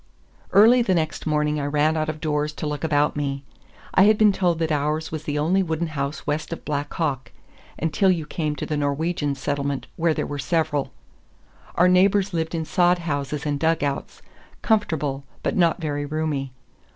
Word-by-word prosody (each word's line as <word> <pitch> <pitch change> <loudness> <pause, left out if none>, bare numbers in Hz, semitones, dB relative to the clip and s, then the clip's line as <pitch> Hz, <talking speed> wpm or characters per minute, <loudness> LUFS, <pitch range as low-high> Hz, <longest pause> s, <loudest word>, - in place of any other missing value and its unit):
Early 230 +5 +7
the 190 -6 +2
next 160 -1 -2
morning 150 0 +1
I 140 - -2
ran 150 +2 +2
out 155 0 -1
of 155 0 -4
doors 150 -1 -1
to 155 - -5
look 150 0 -3
about 150 -2 +2
me. 140 -1 -3 0.5
I 190 - +6
had 215 0 +5
been 215 -1 +5
told 180 -4 +1
that 160 -1 -1
ours 150 +2 -1
was 155 -1 -5
the 145 0 -2
only 170 +6 +2
wooden 165 -2 -1
house 140 -1 -4
west 155 +2 -2
of 165 - -6
Black 145 -1 -2
Hawk—until 155 - -2
you 170 -4 +1
came 150 -1 -2
to - - -4
the 155 - -2
Norwegian 145 +1 -1
settlement, 140 0 -2
where 165 -1 +2
there - - -1
were 145 -1 -5
several. 150 0 0 0.8
Our 180 - +5
neighbors 190 +2 +3
lived 160 0 -2
in 160 -1 -2
sod 180 +2 +3
houses 150 -3 -3
and 145 -1 -1
dugouts—comfortable, 155 - -2 0.2
but - - 0
not 170 -3 +3
very 145 -3 -3
roomy. 150 -3 -2
155 Hz, 175 wpm, -23 LUFS, 145-170 Hz, 0.8 s, Early